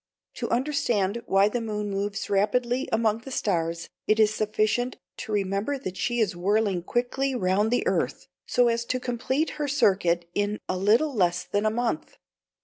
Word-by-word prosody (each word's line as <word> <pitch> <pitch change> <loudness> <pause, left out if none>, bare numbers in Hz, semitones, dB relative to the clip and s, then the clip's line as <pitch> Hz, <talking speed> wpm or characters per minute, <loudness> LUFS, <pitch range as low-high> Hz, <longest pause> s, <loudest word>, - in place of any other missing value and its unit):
To - - -3
understand 235 -6 0
why 195 +1 +4
the 235 +3 -2
moon 210 -2 -3
moves 200 +1 -2
rapidly 240 +6 +1
among 220 -1 +2
the 250 - -10
stars, 165 -8 -1 0.2
it 215 +1 +3
is 215 -1 +4
sufficient 215 +3 0 0.2
to - - -6
remember 200 +6 0
that 190 -9 -6
she 240 +4 -1
is 210 -5 +1
whirling 195 +1 +1
quickly 250 +7 -1
round 195 0 +2
the 245 - +1
earth, - - -1 0.2
so 245 -1 +3
as 235 0 +1
to 255 +1 -1
complete 255 +5 -1
her 295 - 0
circuit 185 -11 +2
in 205 +1 0
a - - -1
little 220 +11 +3
less 180 -4 +1
than 205 +3 0
a - - +4
month. 240 +6 -2
215 Hz, 170 wpm, -26 LUFS, 195-245 Hz, 0.2 s, why